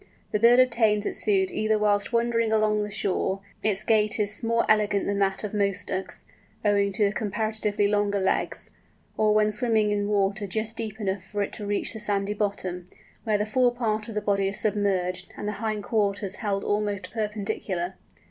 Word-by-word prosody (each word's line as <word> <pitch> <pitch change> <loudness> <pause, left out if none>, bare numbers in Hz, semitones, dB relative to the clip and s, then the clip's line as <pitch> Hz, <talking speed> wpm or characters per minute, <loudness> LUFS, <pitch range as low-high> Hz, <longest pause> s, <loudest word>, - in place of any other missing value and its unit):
The 210 - +1
bird 235 +3 +6
obtains 225 -4 +3
its - - -2
food 195 -3 +2
either 215 0 +1
whilst 205 0 +1
wandering 230 -1 +1
along 215 -1 +2
the 210 - -3
shore—its 200 0 -1
gait 215 -1 +2
is 210 0 +1
more 230 0 +1
elegant 210 -2 +2
than 200 0 -1
that 195 +1 0
of 210 - -4
most 200 -2 0
Ducks, 190 0 -4 0.4
owing 200 -1 +3
to 210 +1 +2
the 200 - +1
comparatively 210 -1 0
longer 205 -1 +1
legs—or 210 +2 -2
when 215 0 +3
swimming 215 -1 +1
in 205 0 0
water 200 0 0
just 220 +4 -3
deep 220 -1 -4
enough 195 -3 -2
for 205 +1 -2
it - - -6
to 210 - -6
reach 205 +2 -1
the 220 - -7
sandy 200 -1 -1
bottom, 190 -4 -3 0.4
when 215 -2 +2
the 210 - -1
fore 245 +3 +3
part 220 -2 -1
of 220 - -7
the 210 - 0
body 200 -1 +1
is 195 - 0
submerged, 185 -4 0
and 205 - -4
the - - 0
hind 215 -2 -2
quarters 200 -3 -1
held 200 -2 -2
almost 205 -3 -1
perpendicular. 205 -4 -3
210 Hz, 185 wpm, -26 LUFS, 200-215 Hz, 0.4 s, bird